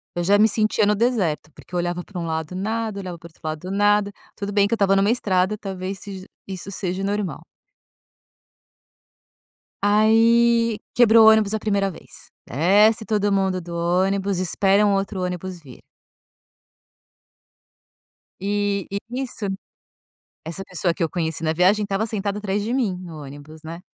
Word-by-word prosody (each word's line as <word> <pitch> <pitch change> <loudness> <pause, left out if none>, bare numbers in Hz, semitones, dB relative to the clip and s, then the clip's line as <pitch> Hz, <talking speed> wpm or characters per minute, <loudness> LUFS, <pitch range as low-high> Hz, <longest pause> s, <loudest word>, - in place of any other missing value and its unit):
eu 175 - -1
já 200 +3 +4
me 215 +1 +5
sentia 215 -1 +1
no 210 - +3
deserto, 200 -10 0
porque - - -17
eu - - 0
olhava 175 0 -2
pra 190 -4 -8
um 170 - -3
lado, 160 +1 -3
nada; 215 +1 -2
olhava 180 -3 -6
para 170 - -12
o - - -18
outro 160 - -28
lado 155 +4 -5
nada. 205 0 +2 0.2
Tudo 200 0 -5
bem 200 0 +3
que 230 - -2
eu - - +4
estava 195 -2 +3
numa 200 +3 +3
estrada, 190 -3 +1
talvez 190 -1 -5
sej 195 -2 -8 0.2
isso 190 0 -7
seja 185 0 -3
normal. 200 -6 -2 2.4
Aí, 225 +2 +4 0.2
quebrou 230 -2 +6
o 220 - +10
ônibus 220 -1 +3
a 220 - 0
primeira 200 -2 0
vez. - - -15 0.2
Desce 205 - +3
todo 205 -2 0
mundo 190 -2 +1
do 170 0 -8
ônibus, 190 +3 0
espera 195 +3 +2
um 200 - +3
outro 195 -1 -2
ônibus 180 0 -4
vir. 130 -5 -14 2.6
E 200 0 -1
e 200 - -2 0.3
isso 230 -4 -6 1.0
essa 170 +4 -5
pessoa, 185 -2 -1
que 175 - -1
eu 165 - 0
conheci 165 -2 -3
na 160 0 +1
viagem, 190 +5 +3
estava 200 +1 -1
sentada 205 -1 -2
atrás 205 0 -2
de 230 +4 -2
mim 215 -9 0
no 160 -3 -9
ônibus, 145 +3 -11
né? 165 +2 -8
195 Hz, 165 wpm, -22 LUFS, 180-210 Hz, 2.6 s, o